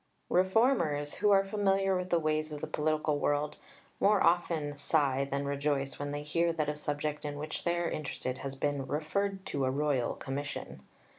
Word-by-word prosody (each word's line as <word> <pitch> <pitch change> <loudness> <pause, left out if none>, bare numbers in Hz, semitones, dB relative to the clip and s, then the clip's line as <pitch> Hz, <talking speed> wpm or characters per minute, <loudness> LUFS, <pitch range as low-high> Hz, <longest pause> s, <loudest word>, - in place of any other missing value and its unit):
Reformers, 185 - +3
who 210 - +3
are 195 -1 +6
familiar 195 -1 +2
with 180 0 -2
the 175 - +3
ways 155 -1 0
of 150 - -5
the - - -3
political 155 -1 0
world, 145 +1 0 0.4
more 205 0 +4
often 165 -4 +2
sigh 140 -2 +1
than 140 +1 -1
rejoice 140 -1 -1
when 145 0 -3
they 145 0 -4
hear 170 +3 +1
that 155 -2 -1
a 150 - -1
subject 150 0 -3
in 145 -1 -4
which 155 +1 -5
they 175 0 +2
are 170 0 0
interested 130 -5 -3
has 135 -1 -5
been 140 -1 -1
"referred 190 +7 -1
to 140 - -2
a 130 - +2
Royal 140 -2 0
Commission." 140 - -5
150 Hz, 180 wpm, -31 LUFS, 145-175 Hz, 0.4 s, are